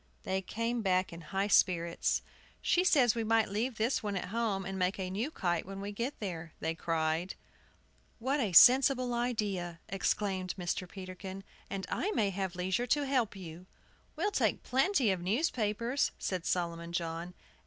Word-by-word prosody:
They 190 0 -1
came 230 +5 -2
back 185 -3 +1
in 170 - -8
high 195 +5 -1
spirits. 170 -4 +2 0.4
"She 355 - +2
says 260 - +5
we 230 - -2
might 225 -1 +2
leave 225 +4 -2
this 230 +4 +1
one 205 -2 -3
at 180 - -4
home, 210 -3 -1
and 190 +1 -4
make 185 +1 +1
a 185 -1 -3
new 220 +9 -1
kite 175 - -1
when 195 +1 -8
we 200 +1 -4
get 235 +7 -4
there," 170 -5 -5
they 160 +1 -1
cried. 165 +1 -1 0.8
"What 265 +5 0
a 220 -7 0
sensible 255 +4 +7
idea!" 205 -8 -2
exclaimed 190 -1 -1
Mr. 180 0 -3
Peterkin; 190 0 -8 0.3
"and 195 -1 -4
I 390 - 0
may 205 -3 +2
have 190 -1 -3
leisure 190 +7 -1
to 290 +3 +2
help 255 -6 +1
you." 180 -1 -9 0.5
"We'll 415 - 0
take - - +1
plenty 265 - +2
of 185 -2 -2
newspapers," 230 - 0
said 180 -3 -3
Solomon 170 -1 -2
John. 170 +1 -3
195 Hz, 165 wpm, -32 LUFS, 180-235 Hz, 0.8 s, sensible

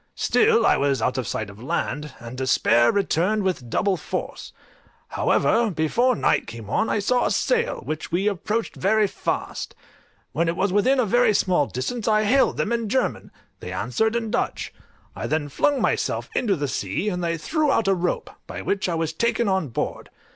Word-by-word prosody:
Still 450 +1 +3
I - - +4
was 140 -2 +1
out 125 +3 0
of 125 - -3
sight 110 - -3
of 100 +2 -14
land, 150 +2 -3
and 120 +1 -9
despair 125 -2 +3
returned 200 +1 +1
with 175 -11 -2
double 190 - +1
force; - - -5 0.6
however, 230 0 +2
before 210 +9 +1
night - - +1
came 115 -3 -8
on 220 - +1
I - - +1
saw 245 +5 +1
a - - 0
sail, 475 -1 0
which 155 0 -5
we 185 +5 +1
approached 210 +3 -2
very 215 +3 +2
fast; 195 - -4 0.6
when 165 +3 0
it 165 - 0
was 195 0 0
within 255 +7 +3
a 250 - +3
very 230 0 +3
small 175 -8 +2
distance 220 - -4
I 215 -1 +3
hailed 260 +6 +3
them 215 - -1
in 230 -2 -1
German; 260 +3 -1 0.3
they 90 - -7
answered 125 - 0
in 225 -2 -2
Dutch. - - -2 0.4
I - - -4
then 155 -2 -1
flung 285 - +1
myself - - -1
into 210 -6 +1
the 145 -3 -2
sea, 100 - -2
and 180 -3 -3
they 170 -1 -1
threw 305 - 0
out 225 -6 +1
a 195 - +4
rope, 180 -1 -2 0.2
by - - -6
which 195 -2 -1
I 170 - -1
was 160 -1 -2
taken 235 +5 0
on 190 -5 +1
board. 115 - -4
190 Hz, 190 wpm, -23 LUFS, 145-225 Hz, 0.6 s, I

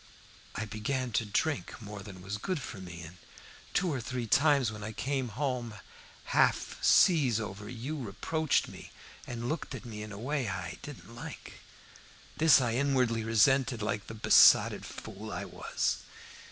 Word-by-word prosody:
I 110 - -2
began 120 +4 -2
to 110 0 0
drink 145 +9 -1
more 105 -2 -8
than 95 -2 -10
was 100 +2 -4
good 185 - -2
for 110 - -7
me, 85 -2 -8
and 85 +2 -11 0.6
two 180 -4 +2
or 130 - -2
three 125 0 -3
times 140 0 +3
when 105 -1 -8
I 110 +1 -5
came 130 +3 -1
home 120 -2 -3 0.6
half - - +2
sees 140 - +5
over 105 -1 -6
you 125 +5 -5
reproached 135 +7 0
me, - - -11 0.4
and 120 -1 -4
looked 155 +3 -3
at - - -9
me 105 -3 -7
in 105 0 -7
a 100 - -7
way 130 +2 -2
I 90 -1 -5
didn't 115 -7 -10
like. 120 - -9 0.8
This 160 -3 +7
I 120 -3 0
inwardly 125 -3 +1
resented, 120 +2 +3
like 105 -1 -2
the 110 - -7
besotted 110 - +6
fool - - -8
I - - -4
was. - - -2
115 Hz, 165 wpm, -30 LUFS, 105-135 Hz, 0.8 s, This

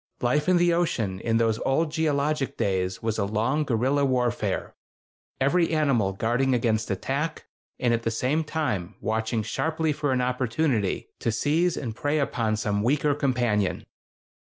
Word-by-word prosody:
Life 145 +8 +1
in 180 - +5
the 175 0 +3
ocean 115 - 0
in 115 +2 +1
those 115 -1 +1
old 150 +4 +1
geologic 150 -2 0
days 95 0 -1
was 110 -1 -1
a 100 - +1
long 115 +9 0
guerrilla 135 +2 +1
warfare—every 130 - -1
animal 135 -11 +1
guarding 120 +6 +1
against 110 -2 0
attack, 135 - -2 0.3
and 120 -2 +2
at 115 - 0
the 115 - -1
same 130 +8 0
time 130 - -2
watching 110 +1 -1
sharply 160 +7 -1
for 145 -1 -1
an 130 - +1
opportunity 125 -3 0
to 115 - 0
seize 155 +9 +1
and 115 -6 -4
prey 145 +4 0
upon 115 -6 0
some 105 -1 -1
weaker 145 +5 +2
companion. 120 -8 0
125 Hz, 150 wpm, -26 LUFS, 110-150 Hz, 0.3 s, in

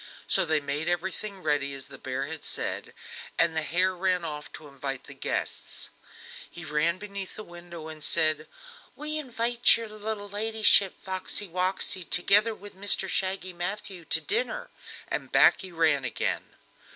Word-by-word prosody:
So 190 - +4
they 155 -1 +2
made 145 +3 -2
everything 190 +3 -2
ready 145 -2 +1
as 135 - -6
the - - -11
bear 130 0 -3
had 160 -1 -6
said, - - -2 0.4
and 165 -1 +3
the 160 - +2
hare 185 +4 +1
ran 180 -1 +1
off 150 -2 -5
to 155 - -10
invite 135 -1 -5
the - - -11
guests. - - -3 0.6
He 175 - -8
came 160 +3 +1
beneath 200 -1 -6
the 215 - -7
window 175 -3 -10
and 155 -1 -8
said: 155 +1 +3 0.5
"We 305 +1 -2
invite 240 -4 +3
your 230 -1 -5
little 215 -1 -5
ladyship 210 -1 +4
Foxey 190 +2 -1
Woxey, 185 +1 +1
together 205 +6 +4
with 205 +1 -11
Mr 195 0 +3
Shaggy 185 0 0
Matthew, 185 +1 -4
to - - +3
dinner," - - -1 0.4
and - - -3
back - - +6
he 190 - -6
ran 160 -5 +3
again. 120 - -2
185 Hz, 160 wpm, -28 LUFS, 160-205 Hz, 0.6 s, back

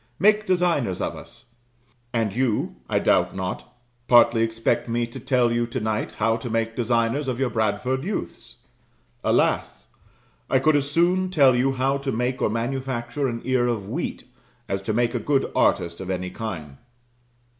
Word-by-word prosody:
"Make 215 +1 +3
designers 170 - +1
of - - -2
us." 120 - -13 0.6
And 115 -4 0
you, 120 -2 -1
I - - +1
doubt - - +2
not, 95 -1 -5 0.4
partly 120 -1 +6
expect 115 +1 0
me 120 +1 0
to 115 - -9
tell 125 -2 +2
you 120 0 0
to 125 +2 -3
night 110 -1 -2
how 115 +1 +1
to 115 +1 -6
make 115 0 -1
designers 120 +4 0
of 125 -1 -2
your 130 -3 0
Bradford 110 +5 0
youths. 170 - -5 0.7
Alas! - - 0 0.6
I - - +4
could 150 +4 +3
as 140 -1 +1
soon 180 +4 +2
tell 140 -8 +5
you 135 +2 +2
how 135 +2 0
to 140 -1 -2
make 125 +2 -1
or - - +2
manufacture 125 +3 -2
an 115 -2 -4
ear 130 -1 +1
of 110 -5 -2
wheat, - - -4 0.4
as 95 0 -2
to 105 - -2
make 120 +1 +1
a 120 - -1
good 140 +2 0
artist 85 -1 +1
of 95 - -6
any 90 -1 -3
kind. 80 -11 -6
120 Hz, 170 wpm, -24 LUFS, 115-135 Hz, 0.7 s, partly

